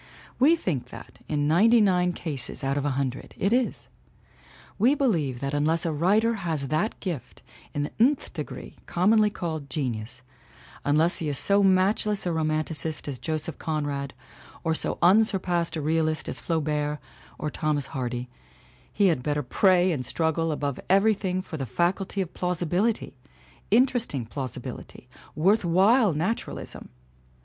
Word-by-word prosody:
We 295 +6 +6
think 165 - -3
that, - - -12
in 145 -1 0
ninety 220 +10 +5
nine 180 -4 +3
cases 150 -4 -5
out 135 +1 0
of 145 0 -1
a - - +2
hundred, 135 -2 -3
it 200 +4 +1
is; 250 0 0 0.9
we 250 +8 +4
believe 160 - 0
that 140 +1 -2
unless 155 +3 +1
a 165 - +1
writer 200 +9 +2
has 155 -6 -2
that 160 +10 -1
gift 170 - -6 0.3
in 145 - -2
the 145 - -4
nth 265 +5 +2
degree - - -7
commonly 210 +4 +3
called 160 -7 -5
genius, 125 -3 -4 0.6
unless 155 +4 +2
he 155 - -2
is 140 - -2
so 200 +7 +3
matchless 195 +2 +2
a 175 - 0
romanticist 155 -1 -2
as 135 -4 -5
Joseph 155 -1 -4
Con 155 -2 -2
rad 140 -1 -4 0.5
or 165 -1 +1
so - - -2
unsurpassed 180 -3 +3
a 155 - -2
realist 155 +1 0
as - - -3
Flaubert 150 -2 -1 0.4
or 150 - -3
Thomas 150 -2 -1
Hardy, 125 -1 -3 0.6
he 200 - +2
had 160 -7 0
better 145 +2 -1
pray 185 +7 +3
and 140 -6 -2
struggle 165 +2 0
above 145 -3 -2
every 195 +4 +5
thing 185 -2 -2
for 160 - -7
the 135 -3 -4
faculty 185 - 0
of 180 -2 -5
plausibility, 180 +5 -1 0.6
interesting 230 - +2
plausi 130 +1 -5
bility, - - -9 0.3
worth 195 +8 +3
while 195 +6 +4
naturalism! 175 +10 -4
165 Hz, 155 wpm, -26 LUFS, 145-195 Hz, 0.9 s, We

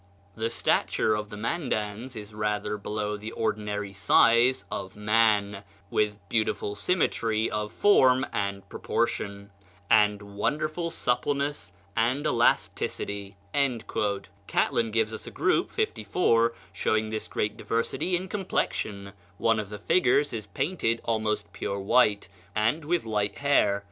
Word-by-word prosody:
"The 115 +1 -1
stature 115 -1 +1
of 105 -1 -3
the 105 - -8
Mandans 115 -2 -2
is 105 -1 -8
rather 105 0 -1
below 105 0 -3
the 110 +2 -7
ordinary 105 -2 -2
size 115 +5 +4
of 95 - -5
man, 105 -2 +2 0.3
with 105 -1 +1
beautiful 110 -2 0
symmetry 110 - 0
of 105 0 -2
form 130 - +4
and 100 -1 -2
proportion, 100 0 -2 0.4
and 105 -1 +5 0.2
wonderful 155 +8 -1
suppleness 140 - -1 0.2
and 125 +6 +1
elasticity." 100 -5 0 1.1
Catlin 115 -1 +1
gives 110 0 -1
a - - -4
group - - +1
(54) 115 -1 +1 0.2
showing 110 +2 0
this 110 - -3
great 105 - -2
diversity 115 +10 -1
in 185 +2 -2
complexion: 105 - -2 0.2
one 115 0 +2
of 105 -2 -4
the 105 - -6
figures 145 - +2
is 110 -3 -5
painted 115 - -1
almost 110 -2 -1
pure 100 - -3
white, 100 0 +3 0.3
and 115 +9 +1
with 170 -1 0
light 105 -2 -1
hair. 140 -8 +3
110 Hz, 125 wpm, -27 LUFS, 105-125 Hz, 1.1 s, and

